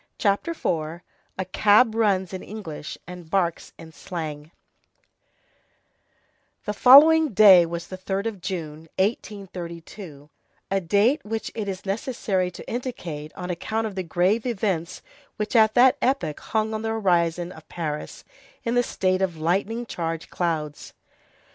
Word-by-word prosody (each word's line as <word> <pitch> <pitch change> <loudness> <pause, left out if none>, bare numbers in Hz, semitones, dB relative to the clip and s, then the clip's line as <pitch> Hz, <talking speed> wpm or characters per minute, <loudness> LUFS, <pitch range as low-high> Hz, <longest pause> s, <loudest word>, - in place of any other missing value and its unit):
CHAPTER 200 +9 +1
IV—A 170 - -5
CAB 215 +4 +5
RUNS 195 -5 +1
IN 185 - -5
ENGLISH 165 -8 -7
AND 180 -2 -10
BARKS 175 -3 -1
IN 160 -1 -12
SLANG 155 -3 -6 2.2
The 210 - -2
following 295 +5 +7
day 190 -4 +8
was 170 0 -5
the 185 +1 -9
3d 195 +2 -3
of 215 -5 -4
June, 165 -4 -5
1832, 180 -6 -5 0.4
a 195 0 +1
date 210 - +2
which 220 +1 -4
it 215 -3 -4
is 190 +1 -6
necessary 195 -3 -1
to 180 - -11
indicate 175 - -5
on 180 -1 -5
account 220 +6 -2
of 215 - -4
the 190 - -3
grave 185 +7 +1
events 190 -6 -2 0.3
which 210 +3 -4
at 220 -1 +5
that 260 +3 +6
epoch 255 - 0
hung 220 0 -1
on 215 - -3
the 225 - -2
horizon 175 -5 +1
of 160 -3 -14
Paris 150 -3 -5 0.4
in 235 - -1
the 245 - +4
state 185 -5 0
of 180 -4 -1
lightning 195 +9 -1
charged 165 -5 -4
clouds. 155 -4 -3
190 Hz, 140 wpm, -24 LUFS, 170-220 Hz, 2.2 s, day